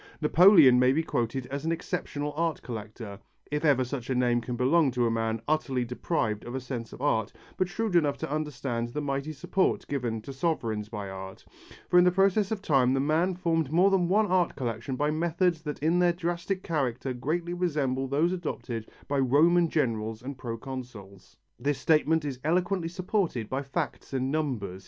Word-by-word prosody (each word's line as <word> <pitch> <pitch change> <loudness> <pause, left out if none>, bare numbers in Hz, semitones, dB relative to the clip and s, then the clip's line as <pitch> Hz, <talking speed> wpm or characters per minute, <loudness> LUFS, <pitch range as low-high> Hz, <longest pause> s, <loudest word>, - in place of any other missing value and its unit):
Napoleon 160 -5 +7
may 125 +1 +4
be 160 +3 +1
quoted 125 -3 -2
as 140 +1 -3
an 165 - 0
exceptional 150 -3 -3
art 165 -1 -1
collector 110 -2 -7 0.3
if 150 +1 -1
ever 140 -4 +4
such 125 0 -5
a 130 - 0
name 120 -1 +2
can 120 +1 -4
belong 140 +5 +3
to 125 -1 0
a 115 - +1
man 115 0 -1
utterly 135 -5 0
deprived 115 -3 -2
of 120 +2 -6
a - - -1
sense 125 -2 -6
of 130 - -9
art 110 -7 +1 0.2
but 185 - 0
shrewd 215 +1 -2
enough 150 -4 +3
to - - -5
understand 135 -6 -2
the 150 - -4
mighty 140 +1 -2
support 170 +6 0
given 120 -5 -2
to 135 - -7
sovereigns 115 -8 -2
by 105 -3 -5
art 95 0 -9 0.4
for 180 - +5
in - - +6
the 180 - +5
process 195 +2 +2
of 215 -3 -3
time 135 -5 +3
the - - +1
man 160 +6 +1
formed 165 -5 0
more 180 +5 +4
than 185 -3 +2
one 215 +3 +4
art 185 -3 +1
collection 120 0 -3
by 150 +3 0
methods 170 +1 0
that 150 -2 -5
in 165 +3 +3
their 175 -1 +4
drastic 175 +2 -3
character 135 -5 -1
greatly 165 +8 -2
resembled 145 -7 -1
those 155 +6 +2
adopted 125 -10 -4 0.2
by 140 -1 0
Roman 160 +6 +4
generals 115 -6 -1
and 140 +2 -5
proconsuls. 115 -5 -8 0.2
This 145 -1 0
statement 155 +2 +2
is 135 -3 -4
eloquently 175 +2 0
supported 175 - -1
by 135 +1 -1
facts 140 +1 -4
and 130 0 -1
numbers. 125 -12 -2
140 Hz, 190 wpm, -28 LUFS, 125-170 Hz, 0.4 s, Napoleon